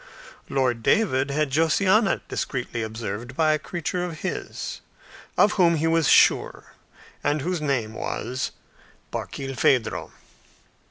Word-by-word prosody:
Lord 130 Hz, -4 st, +1 dB
David 135 Hz, -, +2 dB
had 150 Hz, 0 st, 0 dB
Josiana 190 Hz, -, +3 dB
discreetly 125 Hz, -3 st, -3 dB
observed 110 Hz, +2 st, -5 dB
by 155 Hz, -1 st, +4 dB
a 155 Hz, -, 0 dB
creature 175 Hz, +3 st, -3 dB
of 170 Hz, -3 st, -6 dB
his, 190 Hz, -, -5 dB, 0.6 s
of 210 Hz, -, +5 dB
whom 170 Hz, -3 st, +4 dB
he 160 Hz, 0 st, 0 dB
was 165 Hz, -2 st, +3 dB
sure, -, -, +3 dB, 0.5 s
and 145 Hz, 0 st, +1 dB
whose 175 Hz, +2 st, -2 dB
name 130 Hz, -7 st, -1 dB
was 125 Hz, +3 st, -3 dB, 0.6 s
Barkilphedro. 135 Hz, -3 st, -1 dB
145 Hz, 115 wpm, -24 LUFS, 125-165 Hz, 0.6 s, of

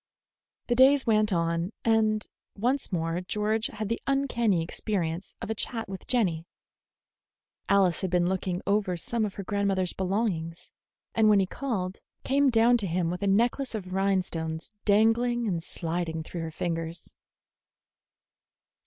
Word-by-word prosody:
The 240 Hz, -, +1 dB
days 265 Hz, +2 st, +6 dB
went 215 Hz, -2 st, +3 dB
on, 170 Hz, +2 st, 0 dB
and 220 Hz, -1 st, +2 dB, 0.3 s
once 250 Hz, +6 st, 0 dB
more 165 Hz, 0 st, -1 dB
George 210 Hz, +4 st, 0 dB
had 215 Hz, -1 st, -5 dB
the 230 Hz, -, -2 dB
uncanny 235 Hz, -10 st, +1 dB
experience 170 Hz, -1 st, -3 dB
of -, -, -3 dB
a -, -, +2 dB
chat 225 Hz, +1 st, -2 dB
with 190 Hz, -1 st, -8 dB
Jenny. 180 Hz, -10 st, +1 dB, 1.2 s
Alice 190 Hz, -4 st, +3 dB
had 190 Hz, -, -1 dB
been 175 Hz, 0 st, +2 dB
looking 185 Hz, -1 st, -2 dB
over 200 Hz, -3 st, +1 dB
some 225 Hz, +6 st, -1 dB
of 200 Hz, -, -5 dB
her 200 Hz, -, -5 dB
grandmother's 195 Hz, -2 st, 0 dB
belongings, 185 Hz, -4 st, -2 dB, 0.4 s
and 220 Hz, -1 st, +4 dB
when 205 Hz, -1 st, +6 dB
he 190 Hz, -, +3 dB
called, 195 Hz, -5 st, -3 dB, 0.2 s
came 280 Hz, +1 st, +3 dB
down 235 Hz, +1 st, +5 dB
to 205 Hz, -4 st, -2 dB
him 170 Hz, 0 st, 0 dB
with 180 Hz, -, -5 dB
a 200 Hz, -, 0 dB
necklace 235 Hz, +5 st, +1 dB
of 185 Hz, -4 st, -5 dB
rhinestones 180 Hz, -5 st, -1 dB
dangling 225 Hz, +3 st, +3 dB
and 175 Hz, -5 st, -1 dB
sliding 165 Hz, -1 st, -3 dB
through 170 Hz, +1 st, -6 dB
her 165 Hz, -, -4 dB
fingers. 165 Hz, +1 st, -4 dB
195 Hz, 145 wpm, -27 LUFS, 175-225 Hz, 1.2 s, days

